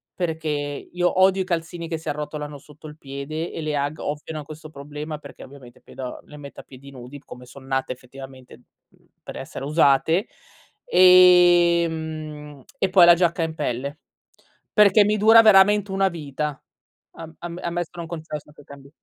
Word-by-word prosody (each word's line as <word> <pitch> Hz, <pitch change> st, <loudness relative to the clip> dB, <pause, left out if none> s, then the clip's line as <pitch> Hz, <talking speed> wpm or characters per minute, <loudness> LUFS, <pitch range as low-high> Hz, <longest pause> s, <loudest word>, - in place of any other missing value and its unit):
perché 160 Hz, -3 st, -3 dB
io 150 Hz, +5 st, -2 dB
odio 190 Hz, 0 st, +3 dB
i -, -, -13 dB
calzini 170 Hz, -1 st, -4 dB
che 165 Hz, -, -3 dB
si 160 Hz, -, -13 dB
arrotolano 150 Hz, 0 st, -6 dB
sotto 150 Hz, +2 st, -18 dB
il 150 Hz, 0 st, -12 dB
piede 140 Hz, +4 st, -6 dB
e -, -, -6 dB
le 155 Hz, -1 st, -3 dB
Ugg 145 Hz, +2 st, -3 dB
ovviano 150 Hz, +1 st, -5 dB
a -, -, -13 dB
questo 155 Hz, +1 st, -11 dB
problema 150 Hz, +1 st, -8 dB
perché 140 Hz, -2 st, -13 dB
ovviamente 130 Hz, -3 st, -15 dB
pedo 130 Hz, -2 st, -9 dB
le 150 Hz, -, -13 dB
metto 140 Hz, -1 st, -11 dB
a -, -, -24 dB
piedi 135 Hz, +1 st, -15 dB
nudi 130 Hz, +1 st, -11 dB
come 125 Hz, -2 st, -13 dB
son 130 Hz, +2 st, -14 dB
nate 135 Hz, -1 st, -2 dB
effettivamente, 130 Hz, 0 st, -14 dB, 0.3 s
umh, -, -, -30 dB, 0.2 s
per -, -, -9 dB
essere 135 Hz, -, -8 dB
usate, 155 Hz, +4 st, +2 dB, 0.6 s
ehm, 170 Hz, -, +3 dB, 0.2 s
e 190 Hz, -, +1 dB
poi 185 Hz, -2 st, +7 dB
la 170 Hz, 0 st, +7 dB
giacca 170 Hz, 0 st, 0 dB
in 160 Hz, -1 st, -4 dB
pelle 140 Hz, 0 st, -4 dB, 0.7 s
perché 210 Hz, 0 st, +5 dB
mi 210 Hz, +1 st, +1 dB
dura 220 Hz, +2 st, +7 dB
veramente 205 Hz, -1 st, +4 dB
una 195 Hz, 0 st, +1 dB
vita. 150 Hz, -3 st, -5 dB, 0.5 s
A 165 Hz, -1 st, -10 dB
am 175 Hz, 0 st, -7 dB
ammesso 175 Hz, 0 st, -4 dB
e -, -, -16 dB
non 170 Hz, -, -6 dB
concesso 155 Hz, -3 st, -8 dB
che 145 Hz, -, -17 dB
cambi 140 Hz, 0 st, -14 dB
155 Hz, 175 wpm, -22 LUFS, 140-175 Hz, 0.7 s, poi